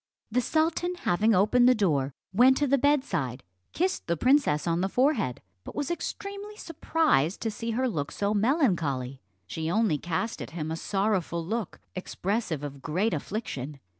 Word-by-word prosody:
The 250 +3 +2
sultan 325 +5 0
having 215 - +2
opened 245 +6 +5
the 255 - +5
door, 145 - +1 0.2
went 255 +6 +6
to 295 - +2
the 280 0 +3
bedside, 180 - 0 0.3
kissed 375 +3 -1
the 170 0 0
princess 255 - +3
on 170 0 +1
the 190 - 0
forehead, 245 - +1 0.2
but - - -9
was 290 +2 -2
extremely 400 +4 -5
surprised 315 - +1
to 225 - -1
see 230 +2 -5
her 260 0 +2
look 150 - -3
so 205 +1 -1
melancholy. 170 - +1 0.2
She 160 - -4
only 200 -5 +2
cast 175 +8 -2
at - - -6
him 155 -1 -3
a - - -1
sorrowful 190 -3 -1
look, 220 +1 -3 0.2
expressive 185 -3 -2
of 140 -1 -6
great 185 +11 0
affliction. 150 - -4
205 Hz, 165 wpm, -27 LUFS, 160-260 Hz, 0.3 s, went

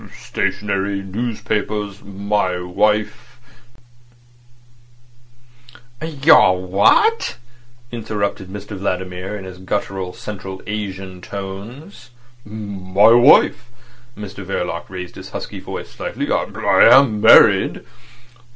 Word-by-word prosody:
"Stationery, 100 -1 -2
newspapers. 105 -1 -3
My 100 -2 -2
wife—" 105 +6 -1 2.7
"Your 145 - +4
what?" 100 - +2 0.5
interrupted 105 -4 -3
Mr 100 +2 -8
Vladimir 95 +1 -4
in 100 - -9
his 90 -1 -10
guttural 95 -1 -3
Central 95 -1 -8
Asian 95 -3 -6
tones. 110 - -9 0.3
"My 100 -1 +1
wife." 120 -1 +5 0.5
Mr 100 -2 -8
Verloc 90 -2 -4
raised 90 -1 -7
his - - -10
husky - - -7
voice - - -8
slightly. - - -5
"I - - +3
am 110 -7 0
married." - - +5
100 Hz, 85 wpm, -19 LUFS, 95-110 Hz, 2.7 s, wife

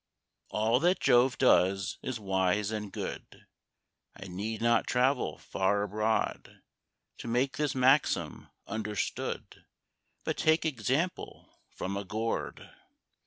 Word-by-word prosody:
All 110 +3 +2
that 175 +5 +2
Jove 120 +1 +4
does 95 -6 +3
is 130 -3 -4
wise 95 +1 0
and 105 -2 -4
good, - - -7 0.7
I 95 - -10
need 100 +4 -4
not 115 0 +2
travel 125 - +1
far 100 +2 0
abroad 110 +2 -2 0.6
To - - -7
make 125 +4 0
this 150 -3 0
maxim 130 +3 +2 0.2
understood, 105 -2 -4 0.6
But - - -2
take 160 +1 +3
example 145 - -2
from 100 +1 -4
a 100 - -3
Gourd. 110 +4 -3
110 Hz, 115 wpm, -30 LUFS, 100-130 Hz, 0.7 s, Jove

